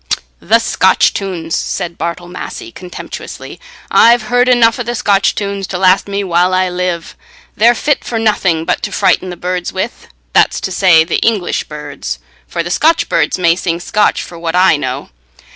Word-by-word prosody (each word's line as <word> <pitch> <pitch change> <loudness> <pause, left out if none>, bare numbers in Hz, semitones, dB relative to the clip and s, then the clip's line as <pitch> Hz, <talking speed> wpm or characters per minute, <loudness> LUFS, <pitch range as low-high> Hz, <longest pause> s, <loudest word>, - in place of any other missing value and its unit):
"The - - +3
Scotch - - +2
tunes!" 175 -4 -3
said 175 -3 -3
Bartle 170 +1 -4
Massey, 345 - -8
contemptuously; 180 - -9 0.3
"I've 235 0 +5
heard 245 +1 +4
enough 235 -2 +4
o' - - -1
the 240 0 -3
Scotch 195 -3 +2
tunes 200 -1 -3
to 185 - -4
last 185 +1 +3
me 200 0 -2
while 180 0 +2
I 185 0 +1
live. 180 -2 -3 0.4
They're 235 +3 +4
fit 290 +5 0
for 230 - -3
nothing 195 -7 +1
but - - -1
to 205 - -4
frighten 185 0 +1
the 180 - -7
birds 180 0 -3
with—that's - - -1
to 190 - -3
say, 180 -4 +5
the 165 - -1
English 210 -6 0
birds, 145 - -6 0.3
for 170 - -3
the 175 - -5
Scotch 320 - +2
birds - - +1
may 170 -2 +3
sing 170 -2 -2
Scotch 210 +4 +1
for 170 - -10
what 165 0 -3
I 180 -2 +5
know. 130 - -4
185 Hz, 175 wpm, -14 LUFS, 170-205 Hz, 0.4 s, I've